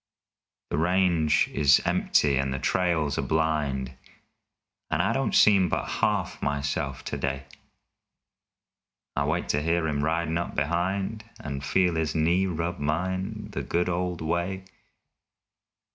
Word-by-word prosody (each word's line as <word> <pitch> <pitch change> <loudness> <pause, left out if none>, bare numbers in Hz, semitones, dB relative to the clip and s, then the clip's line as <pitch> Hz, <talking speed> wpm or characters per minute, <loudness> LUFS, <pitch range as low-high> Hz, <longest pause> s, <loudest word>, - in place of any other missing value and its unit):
The 70 - 0
range 85 -2 +3
is 70 -1 +5
empty 70 -2 +2
and 70 0 0
the 65 - -2
trails 80 0 0
are - - +2
blind, 75 -5 0 1.0
And - - 0
I - - +2
don't - - 0
seem 100 -4 +5
but - - -1
half - - -1
myself 70 -2 -2
today. 70 0 -3 1.7
I 70 - +1
wait 80 +4 -1
to 75 - +1
hear 80 +1 +1
him 75 -2 -1
ridin' 80 +1 0
up 85 - -4
behind 95 +8 -1 0.2
And 70 -1 -5
feel 90 +5 +2
his 80 0 -1
knee 85 +4 +2
rub 85 0 -3
mine 90 +6 -2
the - - -3
good 90 +1 0
old 90 -1 -2
way. 85 +4 -2
80 Hz, 130 wpm, -26 LUFS, 70-90 Hz, 1.7 s, is